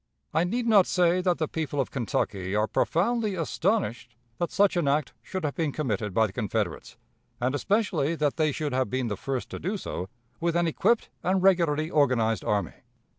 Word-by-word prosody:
I 165 - +3
need 235 +6 -1
not 210 -5 +5
say 180 0 +3
that 180 -1 +1
the 155 - -1
people 150 -2 -3
of 135 - -1
Kentucky 100 -6 -2
are 105 +1 +3
profoundly 210 - 0
astonished 165 - -1 0.2
that 175 - 0
such 200 -1 +3
an 170 -5 +1
act 145 0 +1
should 185 -2 -5
have 145 -2 -1
been 160 -3 -1
committed 110 -8 -2
by 110 +4 +3
the 100 - -6
Confederates, 105 -6 -3 0.4
and 125 +2 0
especially 170 -3 +1
that 150 -3 0
they 155 -2 +2
should 145 -1 -3
have 130 0 +1
been 130 -2 -1
the 105 - -2
first 130 +5 -4
to - - -5
do 195 +5 -2
so 95 - -5 0.3
with 170 -1 0
an 175 0 +3
equipped 220 +8 +1
and 185 +1 +1
regularly 165 -4 +3
organized 120 -7 +2
army. 100 -6 0
155 Hz, 190 wpm, -27 LUFS, 125-180 Hz, 0.4 s, not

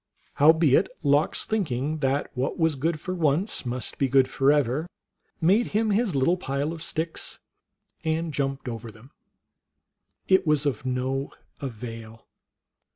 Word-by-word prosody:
Howbeit 160 +2 +5
Lox, 145 +2 +2
think 210 -9 -1
ing 140 +6 -2
that 135 0 0
what 130 +2 -2
was 160 -2 +2
good 155 +4 -1
for 185 - -4
once 160 - 0
must 125 +1 -4
be 135 - +2
good 135 0 +4
forever, 140 +2 +2 0.5
made 195 +8 +3
him 220 -1 +1
his 205 -4 +1
little 155 +7 +3
pile 145 -1 -2
of 165 - -8
sticks 160 0 -3 0.7
and 160 0 -1
jumped 135 -1 -2
over 115 -1 -5
them. 115 +5 -16 1.2
It 190 -2 +4
was 150 -1 +3
of 130 -3 -1
no 130 +2 -2 0.3
avail. 115 -4 -8
145 Hz, 140 wpm, -26 LUFS, 130-165 Hz, 1.2 s, Howbeit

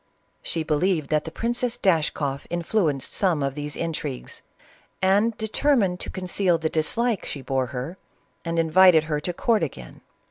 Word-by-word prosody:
She 165 - -2
believed 155 0 0
that 150 -1 +1
the 160 - -6
Princess 240 +4 -1
Dashkoff 155 - 0
influenced 170 -4 -1
some 175 -7 +1
of 135 -1 -1
these 145 0 -5
intrigues, 155 -5 -5 0.6
and 205 +4 +2
determined 220 -4 +1
to - - -3
conceal 185 -1 +1
the 160 0 -1
dislike 210 +8 0
she 140 - -6
bore 130 0 -1
her, 135 +8 -6 0.4
and 165 0 -3
invited 165 0 +6
her 155 -2 -2
to 175 - -3
court 220 +5 +1
again. 65 - -6
165 Hz, 150 wpm, -24 LUFS, 150-195 Hz, 0.6 s, invited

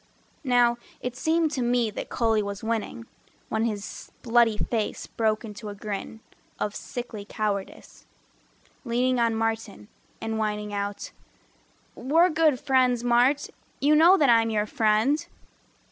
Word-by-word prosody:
Now 245 -2 +3 0.2
it 250 -1 -5
seemed 320 +3 +1
to 270 - -2
me 240 -2 +1
that - - -6
Cully 225 -2 +1
was 200 0 -5
winning, 230 +1 -3 0.4
When 220 +1 0
his 210 -3 -5
bloody 230 -2 +3
face 220 -1 -2
broke 220 0 -1
into 210 0 -8
a 205 - -7
grin 210 +2 -6 0.4
Of 210 - -3
sickly 240 -4 -6
cowardice, 200 - -5 0.8
leaning 250 +2 +1
on 230 -1 +2
Martin 225 - -3 0.3
And 225 0 -3
whining 210 -1 -2
out 200 0 -4 0.8
"We're 330 +7 +3
good 310 -4 +3
friends, 255 -3 +2
Mart, 245 +4 +2 0.3
You 295 +2 +4
know 340 +5 +7
that 290 - +3
I'm 225 -1 +4
your 210 -1 0
friend." 220 +7 +2
230 Hz, 135 wpm, -26 LUFS, 215-250 Hz, 0.8 s, know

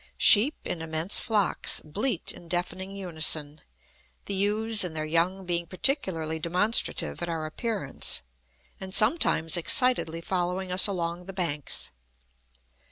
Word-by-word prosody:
Sheep, 245 +8 +6
in 170 - -3
immense 160 +3 +1
flocks, 210 -5 +1
bleat 195 - -3
in 170 - -13
deafening 185 +3 -4
unison, 155 -5 0 0.6
the - - -3
ewes 210 +2 +2
and 175 -3 -4
their 155 0 -3
young 175 +4 0
being 170 -1 -2
particularly 180 - 0
demonstrative 180 +8 0
at 175 - -3
our 160 -2 -4
appearance, 175 - -3 0.6
and 190 0 -5
sometimes 215 - +2
excitedly 175 - +4
following 180 +1 -3
us 180 +3 +5
along 175 -2 -4
the 195 - -8
banks. 160 -6 -3
180 Hz, 125 wpm, -26 LUFS, 165-200 Hz, 0.6 s, Sheep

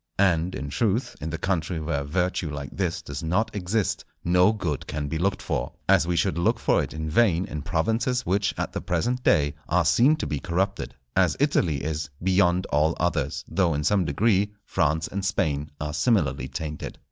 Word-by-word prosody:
And, 90 -2 +2
in 70 - -5
truth, 110 - 0
in 80 - -3
the 80 - -3
country 85 -1 -1
where 75 -2 -2
virtue 90 +2 -1
like 70 -1 -6
this 90 -3 -2
does 70 +2 -6
not 90 +8 0
exist, 100 +2 -1 0.2
no 90 +3 +4
good 85 -10 -3
can 75 -1 -3
be 80 +3 -3
looked 95 +3 0
for, - - -2
as 85 - +4
we 90 - 0
should 85 +1 +1
look 85 - +2
for - - +2
it - - -4
in 80 0 -4
vain 90 +1 +3
in 75 - -5
provinces 115 - 0
which 100 +2 +1
at - - -3
the - - -3
present 120 +9 -1
day 75 -7 +3 0.2
are 90 0 +3
seen 120 - +5
to - - -4
be 75 - -2
corrupted; 95 +5 -2 0.2
as - - +3
Italy 75 -6 +1
is 80 0 -3
beyond 90 -1 +3
all 75 +2 +2
others, 75 -4 -1
though, 90 -5 +1
in 75 - -1
some 100 +3 +3
degree, 100 +6 +2
France 80 -2 +1
and 100 0 -4
Spain 75 -6 0
are 75 0 -3
similarly 75 - +1
tainted. 75 +2 -5
85 Hz, 195 wpm, -25 LUFS, 75-95 Hz, 0.2 s, seen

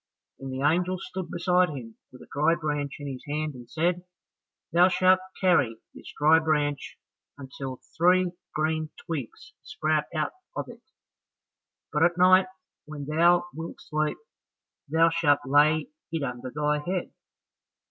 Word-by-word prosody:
Then 135 - -7
the 130 +1 -4
angel 180 +5 +2
stood 185 0 -6
beside 180 +1 +2
him 120 -6 -8 0.2
with 125 - -13
a - - -17
dry 155 +3 +3
branch 145 -4 -3
in 145 - -8
his 130 -2 -6
hand 150 +1 -2
and 120 -2 -12
said, 175 +4 0 0.7
"Thou 175 +2 +6
shalt 185 0 +4 0.2
carry 145 -12 +3 0.2
this - - -11
dry 155 +2 +5
branch 150 -3 -1 0.4
until 135 -1 -7 0.2
three 180 +2 +4 0.2
green 155 0 0 0.2
twigs 145 -8 -6
sprout 155 -1 -1
out 155 - 0 0.2
of - - -4
it, - - -12 1.1
but - - +1
at 175 0 +3
night 185 +1 +6 0.4
when 150 -2 -7
thou 170 +4 +3
wilt 165 +2 -7
sleep, 155 0 -2 0.7
thou 165 +2 +4
shalt 150 -3 +3
lay 150 +3 +3 0.2
it 165 -3 -2
under 125 -1 -4
thy 150 +2 0
head. 180 +4 -3
155 Hz, 145 wpm, -27 LUFS, 145-175 Hz, 1.1 s, Thou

